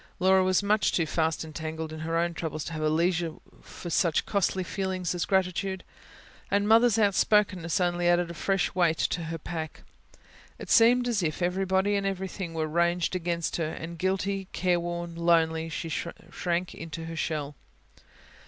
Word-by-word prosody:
Laura 190 +1 +4
was 185 +1 +2
much 210 +1 +2
too 165 - +1
fast 160 0 -1
entangled 160 0 -5
in 155 - -7
her 165 +1 -1
own 170 0 +1
troubles, 155 -2 -4
to 165 - -6
have 155 - -4
leisure 165 +1 +1 0.3
for 175 - -9
such 165 0 +2
a - - -23
costly 190 -2 0
feeling 190 0 -3
as 175 0 -1
gratitude; 190 0 0 0.7
and 200 +1 +1
Mother's 225 0 +5
outspokenness 200 -4 +2
only 175 -1 +1
added 175 0 +2
a - - -6
fresh 195 +2 0
weight 170 -3 +2
to 170 -1 -1
her 165 +1 -4
pack. 160 0 -6 0.7
It - - -7
seemed 245 +1 +5
as 230 -5 +1
if 165 +1 -2
everybody 190 +2 +1
and 200 0 0
everything 190 -2 -4
were 160 -1 0
ranged 170 +3 +1
against 170 -1 -1
her; 165 -2 -1
and 165 +1 -7
guilty, 195 +1 -1
careworn, 175 -1 -1
lonely, 165 -1 +2
she 165 +1 -4
shrank 170 +2 -3
into 165 0 -7
her 165 0 -6
shell. 150 -3 -2
175 Hz, 165 wpm, -28 LUFS, 165-190 Hz, 0.7 s, Mother's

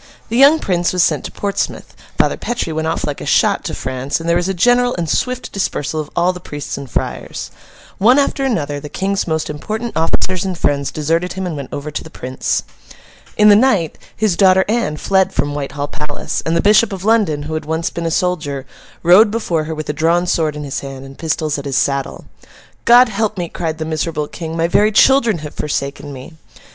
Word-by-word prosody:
The 230 - -2
young 280 +4 +7
Prince 175 - 0
was 180 -2 +3
sent 150 - +1
to - - -5
Portsmouth, 200 -1 -3 0.2
Father - - +2
Petre 240 -9 -3
went 160 0 -2
off 165 - -1
like 145 -1 -4
a - - -5
shot - - +3
to - - -3
France, 130 +3 -3
and 165 - -6
there 170 - +3
was 175 +2 0
a - - 0
general 245 +6 +3
and 170 -2 -2
swift 250 +9 -1
dispersal 155 -5 -2
of 150 -1 -4
all 175 +2 +2
the 180 - -8
priests 145 -3 -6
and 140 -2 -8
friars. - - -4 0.5
One 240 +7 +5
after 280 -1 +1
another, 150 - -1
the 150 +1 -8
King's 195 +5 -1
most 160 -1 -1
important 215 +10 -4
officers 180 +3 0
and 190 -2 -3
friends 140 -3 0
deserted 165 +4 -1
him 190 0 -4
and 175 -3 -3
went 140 -3 -6
over 145 +2 -5
to 145 - -4
the - - -11
Prince. 130 -4 -2 0.7
In 210 0 +6
the 205 - +8
night, 205 -8 +2 0.2
his 215 -5 +1
daughter 190 0 +5
Anne 215 -9 0
fled 190 +3 +1
from 145 - 0
Whitehall 145 0 -4
Palace; 150 -1 -4
and 165 +1 +2
the - - +3
Bishop 210 +2 +5
of 190 -1 -6
London, 205 -10 +2
who 155 +2 -5
had 155 -1 -3
once 160 +2 -1
been 170 -1 -3
a - - +1
soldier, 155 -6 -1 0.4
rode 185 +6 +7
before 180 -8 -1
her 160 +1 -4
with 155 -1 -5
a 150 - -1
drawn 165 +3 +2
sword 160 -4 0
in 150 - -5
his 140 -2 -3
hand, 135 -1 -8
and 135 0 -13
pistols 155 -2 -1
at 140 - -8
his 135 -2 -1
saddle. 140 0 -1 0.6
'God 240 +1 +7
help 215 0 -1
me,' 175 -2 -3
cried 160 -2 -3
the 160 - -4
miserable 155 -1 -2
King: 165 0 -6
'my 165 0 +2
very 210 +5 +3
children 235 -2 +4
have 150 - -8
forsaken 145 -1 -3
me! 135 +4 -10
165 Hz, 220 wpm, -17 LUFS, 150-200 Hz, 0.7 s, the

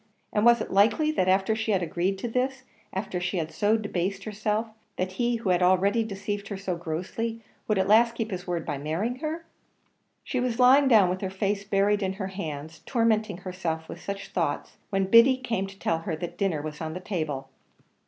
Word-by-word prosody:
And 210 - +2
was 235 -1 +6
it - - -4
likely 225 +11 +4
that 185 -11 +1
after 190 +3 +3
she 220 -1 0
had 185 -2 +1
agreed 175 +4 -1
to 215 - -4
this 260 +3 -1 0.3
after 190 -1 -3
she 180 +1 -1
had 160 -2 -2
so 210 +2 +2
debased 195 -2 -2
herself, 215 +1 -1 0.3
that 185 0 -1
he 240 +5 0
who 225 -4 -2
had 180 0 +3
already 190 +5 +3
deceived 205 -1 -4
her 200 - -5
so 190 -2 -3
grossly 185 +8 -4 0.2
would 215 - +2
at 190 0 +2
last 230 +3 +5
keep 225 -2 -3
his 180 -1 -5
word 175 -2 -2
by 145 -3 -3
marrying 175 - -2
her? 320 +3 -4 0.8
She 255 - -2
was 245 -2 -1
lying 260 +3 +6
down 215 -7 +6
with 185 - -3
her 190 - -2
face 200 +1 -1
buried 200 +1 +2
in 190 -1 -1
her 190 -1 -4
hands, 160 -4 -6
tormenting 220 -5 +1
herself 170 -4 -4
with - - -9
such 200 0 -5
thoughts, - - -2
when 195 -2 +1
Biddy 230 +6 +7
came 230 -7 -2
to 195 0 -12
tell 165 -4 0
her 165 0 -3
that 170 +2 -6
dinner 175 -7 -1
was 155 0 -6
on 160 0 -4
the - - -4
table. 155 -8 -3
195 Hz, 210 wpm, -27 LUFS, 180-225 Hz, 0.8 s, Biddy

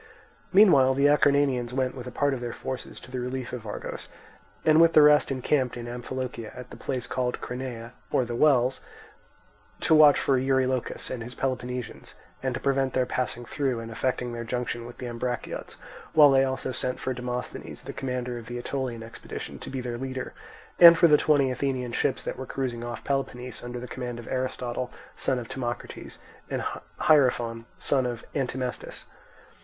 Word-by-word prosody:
Meanwhile 145 -10 +6
the 140 +1 +3
Acarnanians 140 -4 +3
went 130 -1 0
with 125 -2 -8
a - - -6
part 145 +1 +1
of 130 - -3
their 120 -1 -4
forces 130 -2 -6
to 125 - -13
the 130 - -3
relief 125 0 -4
of 115 -3 -6
Argos, 105 - -6 0.6
and 155 +1 +6
with 165 0 +6
the 155 - +8
rest 150 0 +6
encamped 130 -1 0
in 120 0 -6
Amphilochia 120 -1 -5
at 125 0 -9
the - - -8
place 125 -2 -3
called 125 0 -2
Crenae, 125 -2 -6 0.2
or 125 - +2
the 120 0 -4
Wells, 130 -2 +3 1.0
to - - +3
watch 150 -2 +8
for 135 -2 +2
Eurylochus 130 -1 0
and 125 - -4
his 120 +2 -7
Peloponnesians, 125 -2 -4 0.3
and 130 -2 -1
to - - -3
prevent 135 -1 +1
their 130 -1 +2
passing 125 -1 -3
through 130 -2 -1
and 115 0 -7
effecting 125 +1 -1
their 115 0 -4
junction 120 0 -3
with 120 - -11
the 125 - -6
Ambraciots; 120 0 -4 0.4
while 150 -2 +8
they 135 0 +5
also 130 0 -2
sent 125 0 -3
for 130 - -2
Demosthenes, 125 0 -5
the - - -7
commander 125 -2 -3
of 115 - -12
the 120 - -5
Aetolian 120 -2 -3
expedition, 115 +1 -8
to - - -8
be 130 -1 -3
their 120 -1 -4
leader, 130 0 -4 0.5
and 170 -1 +11
for 170 - +6
the 150 - +7
twenty 145 -3 +3
Athenian 130 -1 -2
ships - - 0
that - - -4
were 130 - -5
cruising 125 -3 -3
off 120 -1 -6
Peloponnese 125 -3 -3
under 120 0 -5
the 125 - -7
command 120 -1 -5
of 120 - -9
Aristotle, 130 -1 -2 0.2
son 130 - 0
of 120 -2 -5
Timocrates, 120 -2 -5 0.3
and - - -2 0.4
Hierophon, 120 -6 +3
son 130 -3 +1
of 120 -1 -5
Antimnestus. 130 -2 -3
125 Hz, 180 wpm, -27 LUFS, 120-135 Hz, 1.0 s, and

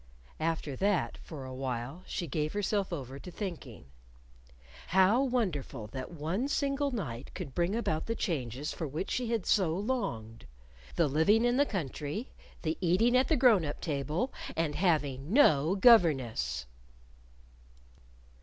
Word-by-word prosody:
After 160 -3 -2
that, 200 -1 0
for 145 -5 -8
a 130 - -7
while, 130 +4 -4
she 175 - -3
gave 150 0 -2
herself 205 -1 0
over 135 -4 -5
to 180 - -9
thinking. 170 - -7 1.0
How 190 +7 +4
wonderful 185 - -1
that 130 -1 -5
one 170 - -2
single 280 0 0
night 145 - -5
could 135 - -6
bring 175 +6 0
about 160 -9 -1
the 230 - -1
changes 140 - -3
for 160 - -4
which 155 +7 -4
she 245 -2 -1
had 230 -5 -1
so 175 -6 +2
longed! 195 - -3 0.5
the - - +3
living 200 - +3
in 245 +1 +2
the 285 +1 +3
country; 160 - -4 0.3
the 160 -1 -1
eating 190 +8 +3
at 255 +1 +4
the 320 - +2
grown 235 -8 +5
up 145 -1 -4
table, 155 - -2 0.2
and 160 -2 0
having 150 -5 0
no 170 - +5
governess. 130 - +4
165 Hz, 145 wpm, -31 LUFS, 140-215 Hz, 1.0 s, grown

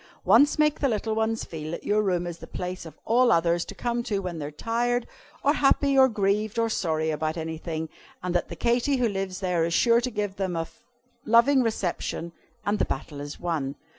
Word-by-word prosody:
"Once 290 +1 +5
make 300 -1 +2
the 275 - +2
little 220 0 -1
ones 220 0 0
feel 155 -2 -7
that 170 - -5
your 210 +1 +2
room 180 -4 0
is 170 -1 -6
the - - -10
place 180 -1 -5
of 155 - -13
all 240 +2 +4
others 170 +1 +3
to - - -10
come 240 0 -1
to 215 -3 -2
when 180 -4 -4
they 145 - -4
are - - -5
tired, 235 +9 -1 0.4
or 285 - +4
happy, 280 -1 +3
or 265 -1 +7
grieved, 210 0 0
or 230 0 +2
sorry 160 -6 0
about 155 +1 -2
anything, 160 0 -4 0.4
and 180 -1 -2
that 175 - 0
the - - -6
Katy 240 +4 +1
who 245 -2 +2
lives 195 -2 -3
there 180 -3 +1
is 170 +1 0
sure 235 0 +4
to 250 - -1
give 205 -4 -3
them 190 -3 -2
a 165 0 -2 0.6
loving 235 +5 +5
reception 180 -6 -2 0.3
and 205 0 0
the - - +2
battle 140 +1 -5
is 145 0 -7
won. 155 -6 -2
195 Hz, 215 wpm, -26 LUFS, 165-235 Hz, 0.6 s, or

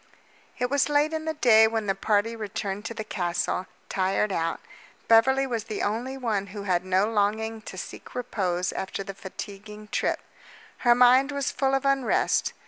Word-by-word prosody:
It 250 +1 -1
was 285 0 +2
late 295 +2 +2
in 315 0 -3
the 315 0 -2
day 220 -6 +6
when 220 -1 -2
the 195 - +1
party 210 +3 0
returned 205 -1 -4
to 230 - -5
the 220 - -4
castle, 180 -2 -2 0.2
tired 195 +2 0
out. 165 -2 -1 0.5
Beverly 265 +4 +5
was 235 -5 -3
the 215 - -4
only 240 +6 -2
one 215 -6 -1
who 200 +1 -7
had 180 -3 +1
no 185 +1 +2
longing 220 +1 0
to 195 - -9
seek - - -9
repose 185 -8 -1
after 190 +1 -4
the 195 - -7
fatiguing 210 +2 -9
trip. - - 0 0.6
Her 240 -1 +5
mind 250 +3 +5
was 280 -1 -1
full 270 0 +1
of 270 0 -1
unrest. 275 -2 +2
220 Hz, 175 wpm, -26 LUFS, 195-250 Hz, 0.6 s, day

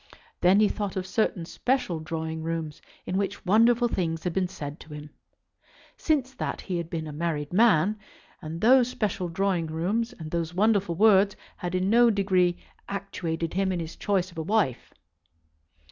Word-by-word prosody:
Then 185 +3 +5
he 215 - +5
thought 205 -2 -3
of 185 -1 -2
certain 190 -3 -1
special 245 -4 -1
drawing 160 0 -4
rooms 160 -2 -4 0.2
in 185 - -1
which 200 0 -3
wonderful 230 +5 +4
things 165 -7 -2
had 180 - -2
been 185 0 +1
said 150 -5 -7
to 155 - -12
him. 150 0 -9 0.8
Since 275 -5 0
that - - -4
he 180 -3 -3
had 170 -1 -4
been 165 -2 -4
a 155 - -6
married 150 -1 -3
man, 210 -1 +4 0.4
and 160 +2 -6
those 250 +2 +6
special 205 -7 -2
drawing 180 -1 0
rooms 195 +10 -1
and 160 -8 -9
those 170 0 -2
wonderful 200 -3 +2
words 200 0 +5 0.2
had 175 0 -4
in 185 +2 +1
no 240 +1 +6
degree 185 -4 +2 0.3
actuated 170 -4 -3
him 190 +1 +1
in 180 - -2
his 165 0 -6
choice 190 -3 -1
of 165 - -8
a - - -1
wife. 170 - 0
185 Hz, 175 wpm, -26 LUFS, 165-210 Hz, 0.8 s, those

